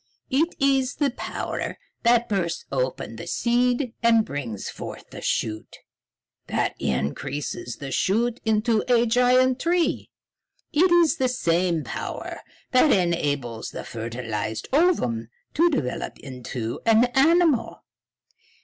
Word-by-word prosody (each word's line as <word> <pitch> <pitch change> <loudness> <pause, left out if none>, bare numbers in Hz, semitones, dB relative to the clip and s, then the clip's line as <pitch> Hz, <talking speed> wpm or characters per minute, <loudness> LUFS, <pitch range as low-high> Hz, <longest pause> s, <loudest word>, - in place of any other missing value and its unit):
It 315 +6 +1
is 270 -1 +2
the 285 -3 +1
power - - -4 0.2
that 235 0 +3
bursts 175 -5 -2
open 130 -4 -2
the 170 - -8
seed 245 +3 +1
and 230 -2 +4
brings 120 -8 -5
forth - - -8
the - - -8
shoot, 110 -1 -2 0.7
that - - 0
increases 120 - -3
the 140 -2 -7
shoot 230 - +1
into 220 0 +2
a 240 -1 +5
giant 250 +2 +3
tree. 345 0 +1 0.6
It 345 +4 +4
is 340 -2 +4
the 260 -4 +1
same 170 -7 +1
power - - -5 0.3
that 260 +3 +5
enables 145 - 0
the - - -7
fertilized 110 -1 -4
ovum 270 - +2 0.3
to 340 +3 +4
develop 135 - -2
into 125 -3 -6
an 225 +1 +6
animal. 295 -5 +3
225 Hz, 120 wpm, -24 LUFS, -, 0.7 s, an